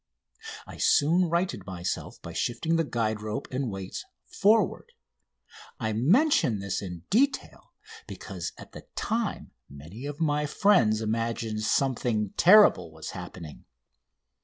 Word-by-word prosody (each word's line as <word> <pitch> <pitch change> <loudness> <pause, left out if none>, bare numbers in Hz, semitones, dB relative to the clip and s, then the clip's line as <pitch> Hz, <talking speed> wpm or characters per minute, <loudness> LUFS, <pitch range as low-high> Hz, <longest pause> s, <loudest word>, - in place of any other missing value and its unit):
I - - -11
soon 170 +4 +3
righted 170 - -1
myself 90 -1 -4
by - - -8
shifting 145 +8 -1
the 165 - +2
guide 110 -6 -2
rope 105 0 -4
and 130 +1 -2
the - - -3
weights 95 -3 -6 0.2
forward. 220 - +1 0.9
I 110 -1 -1
mention 150 - +3
this 100 -1 -3
in 90 -4 -7
detail 265 +6 0 0.4
because - - -6
at - - -12
the - - -12
time 225 -1 -2 0.2
many 80 - -9
of 145 0 -7
my 150 -2 +1
friends 125 - +3
imagined 115 0 -2
something 115 -3 0
terrible 180 - +6
was 80 0 -8
happening. 80 -5 -9
120 Hz, 130 wpm, -27 LUFS, 105-170 Hz, 0.9 s, terrible